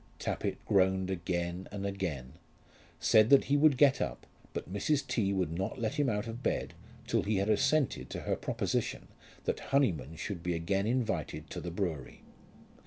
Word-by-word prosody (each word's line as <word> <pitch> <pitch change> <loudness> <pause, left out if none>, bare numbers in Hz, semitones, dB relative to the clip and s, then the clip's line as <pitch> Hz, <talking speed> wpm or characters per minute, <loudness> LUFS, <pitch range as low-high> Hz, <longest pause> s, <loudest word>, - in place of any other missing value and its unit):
Tappitt - - -2
groaned 95 -1 +2
again 85 0 -2
and 100 -1 -4
again, 85 -10 -3 0.7
said 110 +1 +5
that 140 - +7
he 140 - +1
would 145 -2 +5
get 140 -1 +5
up, - - -3 0.3
but 90 - -6
Mrs. 140 +9 +1
T. 100 -4 0
would 95 -5 0
not 95 +4 -2
let 125 +5 -2
him 145 - +3
out 105 -1 -1
of 115 +1 -6
bed - - -1 0.3
till - - +1
he 105 +1 0
had 100 +2 +1
assented 145 +6 +1
to - - -5
her - - 0
proposition - - -2 0.3
that - - -3
Honyman 85 - +1
should 85 +4 -5
be 85 0 -1
again 95 +5 0
invited 115 - -2
to - - -5
the 90 - -4
brewery. 85 -6 -4
100 Hz, 175 wpm, -31 LUFS, 85-115 Hz, 0.7 s, that